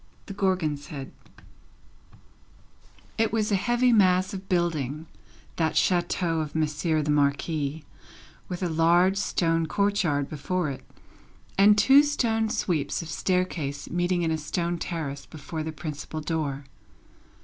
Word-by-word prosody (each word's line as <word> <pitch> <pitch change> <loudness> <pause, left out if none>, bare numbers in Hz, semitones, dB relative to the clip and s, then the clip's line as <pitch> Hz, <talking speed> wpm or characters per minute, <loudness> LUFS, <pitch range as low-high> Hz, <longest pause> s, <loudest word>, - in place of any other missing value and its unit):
The 200 - -7
Gorgon's 185 -7 -1
Head 135 -3 -7 2.1
It 225 - +2
was 215 -1 0
a - - +4
heavy 240 +5 +2
mass 185 -1 +3
of 195 0 -7
building, 160 -4 -1 0.5
that 160 -2 0
chateau 175 -2 +1
of 155 -1 -4
Monsieur 155 0 0
the 150 - 0
Marquis, 145 +1 0 0.7
with 180 +1 -4
a - - +1
large 170 +3 +3
stone 165 -4 0
courtyard 180 -7 +1
before 155 +2 -2
it, 130 -1 -8 0.7
and 205 +2 +6
two 270 +7 +7
stone 225 -7 0
sweeps 165 -7 -1
of 165 - -9
staircase 165 -7 -2
meeting 175 0 0
in 165 - 0
a 160 - -1
stone 170 +2 -2
terrace 145 -6 -4
before 155 +1 -6
the 160 +1 -4
principal 155 0 -6
door. 150 -3 -3
165 Hz, 130 wpm, -26 LUFS, 150-190 Hz, 2.1 s, two